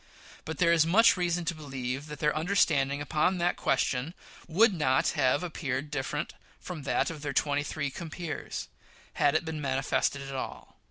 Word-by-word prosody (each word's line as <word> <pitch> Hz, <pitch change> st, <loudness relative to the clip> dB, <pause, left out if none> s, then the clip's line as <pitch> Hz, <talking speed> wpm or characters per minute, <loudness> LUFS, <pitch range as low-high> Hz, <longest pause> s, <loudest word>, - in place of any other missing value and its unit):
But 160 Hz, -1 st, -5 dB
there 170 Hz, +1 st, +4 dB
is 165 Hz, -2 st, +5 dB
much 210 Hz, +8 st, +5 dB
reason 175 Hz, -1 st, 0 dB
to 170 Hz, -, 0 dB
believe 135 Hz, -2 st, -5 dB
that 150 Hz, 0 st, -7 dB
their 150 Hz, +1 st, +1 dB
understanding 145 Hz, -5 st, +2 dB
upon 155 Hz, +6 st, +1 dB
that 175 Hz, 0 st, +1 dB
question 135 Hz, +7 st, 0 dB, 0.3 s
would 205 Hz, +6 st, +4 dB
not 130 Hz, -6 st, +2 dB
have 145 Hz, +2 st, +2 dB
appeared 145 Hz, -4 st, -3 dB
different 135 Hz, -3 st, -3 dB, 0.3 s
from 175 Hz, -4 st, -7 dB
that -, -, +1 dB
of 155 Hz, -3 st, -8 dB
their 140 Hz, -1 st, -3 dB
twenty 145 Hz, +2 st, +1 dB
three 145 Hz, -1 st, -3 dB
compeers, 165 Hz, +1 st, -5 dB, 0.5 s
had 145 Hz, +1 st, +4 dB
it 155 Hz, -, +1 dB
been 160 Hz, -1 st, -4 dB
manifested 135 Hz, 0 st, 0 dB
at 135 Hz, 0 st, -7 dB
all. 130 Hz, -, -6 dB
150 Hz, 170 wpm, -29 LUFS, 140-170 Hz, 0.5 s, is